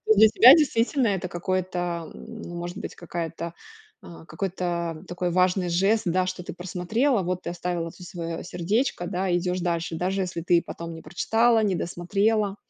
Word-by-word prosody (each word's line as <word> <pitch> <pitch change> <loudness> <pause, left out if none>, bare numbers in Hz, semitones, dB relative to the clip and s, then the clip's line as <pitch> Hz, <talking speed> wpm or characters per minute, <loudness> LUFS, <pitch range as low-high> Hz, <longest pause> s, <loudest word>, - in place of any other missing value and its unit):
Для 220 +2 +8
тебя 240 +4 +9
действительно 270 -4 +2
это 190 -2 -1
какой-то, 175 -1 -2
м, 225 -1 -10
ну, 175 - -7
может 175 0 -5
быть, - - -6
какая-то, 170 -1 -5 0.5
а, 170 -1 -12
какой-то, 170 0 -3
м, 165 - -14
такой 180 0 -2
важный 180 0 +2
жест, 195 +6 +2
да, 185 +1 +2
что 185 0 -4
ты - - -7
просмотрела, 190 - 0
вот 180 +1 -3
ты - - -3
оставила 175 -1 -3
тут 180 +1 -12
свое 165 -2 -5
сердечко, 180 +4 -1
да, 185 0 -1
идешь 180 +1 -1
дальше, 170 -1 -2
даже 190 +3 -1
если 175 -2 -3
ты 170 0 +3
потом 170 0 -7
не 165 - -9
прочитала, 225 +6 +2
не 200 -3 +1
досмотрела. 200 +4 0
180 Hz, 175 wpm, -25 LUFS, 170-195 Hz, 0.5 s, тебя